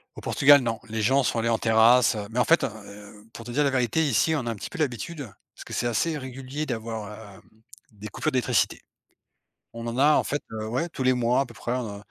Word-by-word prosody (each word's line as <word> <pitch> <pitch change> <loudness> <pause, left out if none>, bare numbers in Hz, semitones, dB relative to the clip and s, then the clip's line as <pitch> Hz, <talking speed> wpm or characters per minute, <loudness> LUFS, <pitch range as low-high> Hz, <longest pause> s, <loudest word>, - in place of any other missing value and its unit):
Au - - -9
Portugal, 145 0 +5
non. 115 -2 -2
Les 110 0 -2
gens 135 +5 +3
sont 120 - 0
allés 115 - 0
en 115 - +2
terrasse, 110 +1 +4
heu. 105 -1 -5
Mais 115 - -7
en - - +3
fait, 165 - +4
heu, 105 -2 -8
pour 115 - -10
te 120 - -7
dire 150 +4 +1
la 140 - +1
vérité, 130 +4 +1
ici, 150 +5 +2
on 135 -6 -2
a 115 - -1
un - - -4
petit 95 - -7
peu - - -9
l'habitude. 155 +2 -3 0.3
Parce - - -10
que - - -9
c'est 120 - -1
assez 150 +8 0
régulier 135 +3 -6
d'avoir, 110 -4 -6
heu, - - -17 0.5
des 105 0 -10
coupures 155 - -2
d'électricité. 125 -3 0 0.9
On 115 0 -7
en 115 +2 -4
a, 150 +2 +5
en - - +2
fait 145 - -2
heu, 110 -1 -5
ouais, 130 +9 -1
tous 160 - -6
les 130 0 +4
mois, 125 +1 +1
à 140 - -1
peu 120 - -13
près, 120 - -4
on 125 -2 -2
a 100 - -7
120 Hz, 255 wpm, -25 LUFS, 110-135 Hz, 0.9 s, Portugal